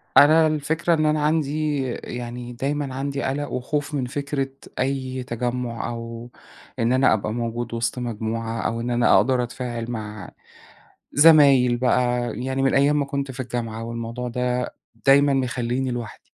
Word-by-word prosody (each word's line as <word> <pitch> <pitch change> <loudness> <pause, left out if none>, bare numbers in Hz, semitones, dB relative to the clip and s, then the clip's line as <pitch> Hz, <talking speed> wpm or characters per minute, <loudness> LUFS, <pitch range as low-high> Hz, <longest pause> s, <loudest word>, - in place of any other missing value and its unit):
أنا 155 +2 +7
الفكرة 155 +3 +1
إن 155 -1 +2
أنا 150 0 +1
عندي 150 -1 0 0.3
يعني 120 0 -6
دايمًا 140 +2 -2
عندي 140 +1 -3
قلق 145 +2 -2
وخوف 145 +4 -2
من 135 -3 -1
فكرة 140 0 -2 0.3
أي 130 -1 -2
تجمّع، 120 -1 -3
أو 115 0 -7 0.5
إن 115 0 +2
أنا 130 +1 +4
أبقى 105 0 -2
موجود 120 0 -3
وسط 115 +1 -1
مجموعة، 115 -1 -3
أو 115 0 -2
إن 120 +1 -3
أنا 120 0 +4
أقدر 125 +2 +3
أتفاعل 120 -1 -5
مع 110 -2 -6 0.8
زمايل 140 -5 +6
بقى، 120 -1 +1
يعني 130 +1 -1
من 135 - +2
أيام 145 +2 +4
ما - - +1
كنت 140 0 -3
في 130 0 -7
الجامعة، 115 -3 -4
والموضوع 115 +1 -4
ده 125 +1 -2 0.3
دايمًا 140 +1 +6
مخليني 130 0 -1
لوحدي. 120 -4 -6
125 Hz, 150 wpm, -23 LUFS, 120-140 Hz, 0.8 s, أنا